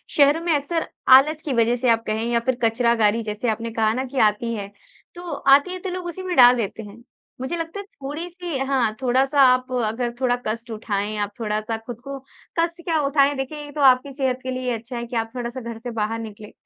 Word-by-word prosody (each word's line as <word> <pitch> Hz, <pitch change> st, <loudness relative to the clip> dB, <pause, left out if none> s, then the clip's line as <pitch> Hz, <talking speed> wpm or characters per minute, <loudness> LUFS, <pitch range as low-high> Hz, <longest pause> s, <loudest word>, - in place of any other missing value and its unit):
शहरों 290 Hz, +2 st, +5 dB
में 335 Hz, -1 st, +1 dB
अक्सर 320 Hz, +3 st, -2 dB, 0.3 s
आलस 305 Hz, +3 st, +1 dB
की 285 Hz, -, -1 dB
वज़ह 235 Hz, 0 st, +3 dB
से 245 Hz, 0 st, 0 dB
आप 230 Hz, 0 st, +3 dB
कहें 220 Hz, +1 st, -1 dB
या 235 Hz, -, +3 dB
फिर 260 Hz, -, +1 dB
कचरागाड़ी, 230 Hz, -1 st, +2 dB
जैसे 215 Hz, +2 st, -2 dB
आपने 230 Hz, +1 st, -2 dB
कहा 220 Hz, -1 st, +2 dB
ना 255 Hz, +3 st, -2 dB
कि 265 Hz, +1 st, -4 dB
आती 230 Hz, +3 st, -4 dB
है, 200 Hz, -2 st, -5 dB, 0.5 s
तो 350 Hz, -, -8 dB
आती 280 Hz, +4 st, +4 dB
है, 370 Hz, -, -5 dB
तो 375 Hz, -, -5 dB
लोग 365 Hz, 0 st, -5 dB
उसी 370 Hz, +2 st, -6 dB
में 365 Hz, -1 st, -2 dB
डाल 245 Hz, 0 st, +8 dB
देते 220 Hz, 0 st, -3 dB
हैं। 210 Hz, +3 st, -13 dB, 0.4 s
मुझे 260 Hz, +6 st, -2 dB
लगता 330 Hz, +4 st, -5 dB
है, 400 Hz, -, -7 dB
थोड़ी-सी 335 Hz, +1 st, -6 dB
हाँ, 265 Hz, -5 st, +1 dB
थोड़ा-सा 265 Hz, +3 st, +2 dB
आप 255 Hz, +1 st, +1 dB, 0.2 s
अगर 240 Hz, +2 st, -2 dB
थोड़ा 250 Hz, -2 st, +2 dB
कष्ट 230 Hz, +2 st, -4 dB
उठाएँ, 210 Hz, -1 st, -3 dB
आप 205 Hz, -1 st, -2 dB
थोड़ा-सा 215 Hz, 0 st, -2 dB
खुद 240 Hz, -2 st, -7 dB
को 275 Hz, 0 st, -6 dB, 0.4 s
कष्ट 335 Hz, +1 st, -1 dB
क्या 325 Hz, -2 st, +1 dB
उठाएँ? 280 Hz, 0 st, +3 dB
देखिए, 270 Hz, +3 st, -4 dB
ये 290 Hz, -, -10 dB
तो 295 Hz, -, -4 dB
आपकी 265 Hz, +1 st, +5 dB
सेहत 265 Hz, -2 st, -1 dB
के 260 Hz, -, -3 dB
लिए 255 Hz, 0 st, -3 dB
ही 250 Hz, -, -1 dB
अच्छा 235 Hz, +2 st, -8 dB
है 235 Hz, -, -4 dB
कि 240 Hz, +1 st, -8 dB
आप 225 Hz, -1 st, -1 dB
थोड़ा-सा 245 Hz, +1 st, -4 dB
घर 235 Hz, -1 st, -6 dB
से 245 Hz, +1 st, -6 dB
बाहर 225 Hz, 0 st, -2 dB
निकलें। 215 Hz, -2 st, -9 dB
250 Hz, 230 wpm, -22 LUFS, 225-285 Hz, 0.5 s, डाल